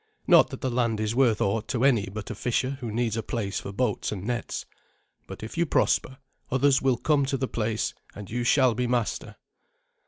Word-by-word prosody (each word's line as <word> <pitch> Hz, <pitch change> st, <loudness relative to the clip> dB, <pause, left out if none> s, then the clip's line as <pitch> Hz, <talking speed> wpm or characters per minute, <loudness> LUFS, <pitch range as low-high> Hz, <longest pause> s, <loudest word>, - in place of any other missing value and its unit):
Not -, -, +6 dB
that -, -, -8 dB
the 130 Hz, -, -1 dB
land 120 Hz, -3 st, 0 dB
is 110 Hz, 0 st, -1 dB
worth 120 Hz, -4 st, +3 dB
aught 105 Hz, +3 st, 0 dB
to 125 Hz, -1 st, -1 dB
any 120 Hz, -8 st, +3 dB
but 105 Hz, +2 st, -6 dB
a -, -, -2 dB
fisher 125 Hz, +4 st, -1 dB
who 120 Hz, -4 st, -5 dB
needs 115 Hz, 0 st, 0 dB
a 115 Hz, -, -1 dB
place 105 Hz, -4 st, -3 dB
for -, -, -7 dB
boats 125 Hz, +6 st, -1 dB
and 100 Hz, -2 st, -5 dB
nets; 120 Hz, 0 st, -3 dB, 0.6 s
but -, -, -9 dB
if 110 Hz, +9 st, -6 dB
you 170 Hz, -, +2 dB
prosper, 130 Hz, -2 st, +1 dB, 0.3 s
others 135 Hz, +1 st, +3 dB
will 130 Hz, -2 st, +2 dB
come 145 Hz, +2 st, +2 dB
to 135 Hz, -, 0 dB
the 130 Hz, 0 st, -1 dB
place, 110 Hz, -2 st, -1 dB, 0.2 s
and 100 Hz, -1 st, -8 dB
you 120 Hz, +4 st, -2 dB
shall 130 Hz, 0 st, +4 dB
be 125 Hz, +2 st, -1 dB
master." 120 Hz, -2 st, -1 dB
120 Hz, 210 wpm, -26 LUFS, 110-130 Hz, 0.6 s, Not